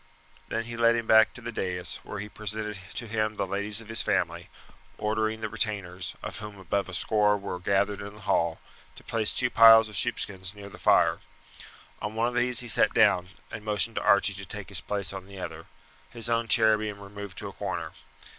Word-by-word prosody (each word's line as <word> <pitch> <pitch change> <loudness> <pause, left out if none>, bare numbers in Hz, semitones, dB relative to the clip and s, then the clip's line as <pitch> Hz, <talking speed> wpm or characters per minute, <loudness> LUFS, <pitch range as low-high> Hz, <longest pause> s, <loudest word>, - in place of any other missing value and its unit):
Then 115 - -2
he 115 +1 -7
led 115 0 +4
him 115 -1 -2
back 110 0 +6
to 120 - -10
the 120 0 -5
dais, 90 -4 -1
where - - -7
he 100 +1 -5
presented 105 -1 -4 0.2
to 120 - -3
him 110 -1 -1
the - - -1
ladies 100 +3 -2
of 115 - -13
his 115 0 0
family, - - -1 0.5
ordering 110 +1 -1
the 110 - -1
retainers, 100 -5 -3
of - - -5
whom 105 -1 -8
about 95 +1 -2
a - - -8
score 105 +2 +2
were 100 -2 -5
gathered 100 +2 0
in 100 +1 -8
the 105 - -14
hall, 85 -5 0 0.4
to - - -14
place 110 -2 +1
two 125 -1 +1
piles 115 -1 +8
of 105 - -10
sheepskins 95 +1 -2
near 100 -1 -10
the - - -13
fire. - - +4 0.8
On 105 +1 -4
one 115 +1 +1
of - - -8
these 120 0 +3
he 120 - -6
sat 110 - +3
down, 90 +1 +4 0.2
and 110 - -7
motioned 105 +1 0
to - - 0
Archie 100 0 +4
to 100 0 -7
take 105 +2 -6
his 95 -2 0
place 100 -1 -2
on 95 -1 -8
the 100 0 -11
other - - -7 0.4
his 120 -1 -2
own 115 0 +1
chair 110 -1 +5
being 105 -1 -4
removed 100 -1 -9
to - - -6
a - - -9
corner. - - -4
105 Hz, 215 wpm, -27 LUFS, 100-110 Hz, 0.8 s, piles